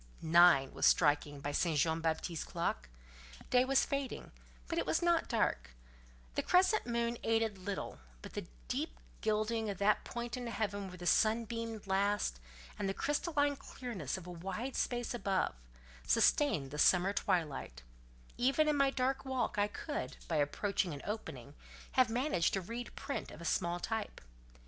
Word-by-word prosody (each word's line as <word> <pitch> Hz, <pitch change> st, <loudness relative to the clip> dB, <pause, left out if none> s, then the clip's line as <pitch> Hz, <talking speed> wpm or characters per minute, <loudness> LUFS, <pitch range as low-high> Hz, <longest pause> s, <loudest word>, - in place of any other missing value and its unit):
Nine 165 Hz, -4 st, +6 dB
was -, -, +3 dB
striking 145 Hz, -2 st, +3 dB
by 145 Hz, -, -2 dB
St. 160 Hz, +1 st, +1 dB
Jean 160 Hz, +3 st, +2 dB
Baptiste's 160 Hz, 0 st, -1 dB
clock; -, -, -3 dB, 0.6 s
day 250 Hz, 0 st, +6 dB
was 270 Hz, +1 st, +3 dB
fading, 275 Hz, -2 st, -3 dB, 0.4 s
but 335 Hz, -, -1 dB
it -, -, -1 dB
was 325 Hz, -, +1 dB
not 345 Hz, -1 st, +2 dB
dark: 215 Hz, -, 0 dB, 0.6 s
the -, -, 0 dB
crescent 370 Hz, -, +3 dB
moon 235 Hz, 0 st, -1 dB
aided 225 Hz, -3 st, +1 dB
little, 195 Hz, +1 st, -4 dB, 0.2 s
but -, -, -9 dB
the -, -, -5 dB, 0.2 s
deep -, -, -3 dB, 0.2 s
gilding 215 Hz, +1 st, 0 dB
of 200 Hz, -, -3 dB
that 205 Hz, +2 st, +2 dB
point 235 Hz, 0 st, -4 dB
in 250 Hz, -1 st, -5 dB
heaven 205 Hz, -3 st, -2 dB
where 180 Hz, -1 st, -9 dB
the 175 Hz, -, -8 dB
sun 225 Hz, +5 st, +3 dB
beamed 230 Hz, -1 st, -5 dB
last, 195 Hz, -, +1 dB, 0.4 s
and 195 Hz, -, 0 dB
the 195 Hz, -, -2 dB
crystalline 290 Hz, -1 st, +1 dB
clearness 230 Hz, -, -5 dB
of 185 Hz, -, -9 dB
a 180 Hz, -, -7 dB
wide 195 Hz, +9 st, -4 dB
space 245 Hz, -1 st, -1 dB
above, 195 Hz, -5 st, 0 dB, 0.5 s
sustained 155 Hz, -, +3 dB
the 150 Hz, -, -5 dB
summer 185 Hz, +4 st, +5 dB
twilight; 150 Hz, -, -1 dB, 0.6 s
even 275 Hz, +5 st, +3 dB
in 300 Hz, -, +3 dB
my 275 Hz, -1 st, +4 dB
dark 265 Hz, 0 st, 0 dB
walk 260 Hz, -5 st, -1 dB
I 205 Hz, -, +3 dB
could, 290 Hz, +8 st, -5 dB
by 165 Hz, -, 0 dB
approaching 175 Hz, +3 st, 0 dB
an 140 Hz, -, -9 dB
opening, 140 Hz, -, -5 dB, 0.4 s
have 255 Hz, -3 st, +4 dB
managed 240 Hz, -, +1 dB
to 195 Hz, -, -1 dB
read 235 Hz, +6 st, -6 dB
print 280 Hz, -, -4 dB
of -, -, -11 dB
a 170 Hz, -, -8 dB
small 175 Hz, +1 st, 0 dB
type. 220 Hz, +2 st, -3 dB
210 Hz, 165 wpm, -34 LUFS, 175-245 Hz, 0.6 s, Nine